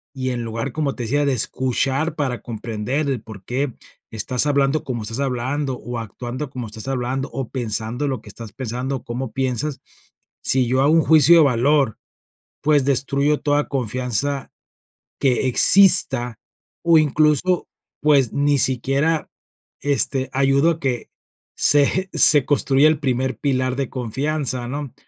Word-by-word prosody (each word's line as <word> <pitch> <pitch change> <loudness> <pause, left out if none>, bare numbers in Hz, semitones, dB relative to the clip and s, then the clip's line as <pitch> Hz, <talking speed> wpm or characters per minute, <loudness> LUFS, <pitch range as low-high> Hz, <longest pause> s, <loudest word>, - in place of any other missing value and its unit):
y 130 -1 -3
en 120 -2 -3
lugar, 115 +3 -4
como 145 -2 -2
te 120 - -5
decía, 145 +6 0
de 140 - +1
escuchar 130 +5 -1
para 135 -6 -3
comprender 115 +5 -3
el 130 -5 -2
por 105 -3 -12
qué, 130 +4 -2 0.4
estás 115 +5 -1
hablando 140 +1 +1
como 120 -4 -5
estás 115 +4 -5
hablando, 135 +1 -2
o 120 -1 -6
actuando 120 +5 -6
como 125 -3 -7
estás 110 +3 -6
hablando, 135 +1 -3
o 135 -3 -5
pensando 115 +2 -3
lo 130 -5 -3
que 105 - -14
estás 110 +1 -10
pensando, 130 +2 -4
o - - -14
cómo 120 0 -5
piensas, 130 +3 -2 0.6
si 130 -1 +1
yo 130 +2 +1
hago 145 +3 +3
un 165 - +5
juicio 160 +1 +5
de 165 - +6
valor, 135 -1 +1 0.6
pues, 145 -2 +2
destruyo 140 +2 +1
toda 145 0 0
confianza 130 +2 -2 0.7
que 130 -1 +2
exista, 135 - +5 0.4
o 170 -1 +5
incluso, 155 +3 +1 0.3
pues, 140 -6 +3
ni 145 0 +1
siquiera, 135 +6 0 0.5
este, 135 -2 +1
ayudo 140 +4 +2
a 165 - -5
que 125 -5 -3 0.5
se 145 -1 +4
eje 185 +6 -1
se 145 -3 +6
construya 145 0 +3
el 155 0 +2
primer 130 -2 -2
pilar 130 -2 -1
de 135 -1 -2
confianza, 130 +1 -3
¿no? 140 +1 -6
135 Hz, 155 wpm, -20 LUFS, 120-145 Hz, 0.7 s, de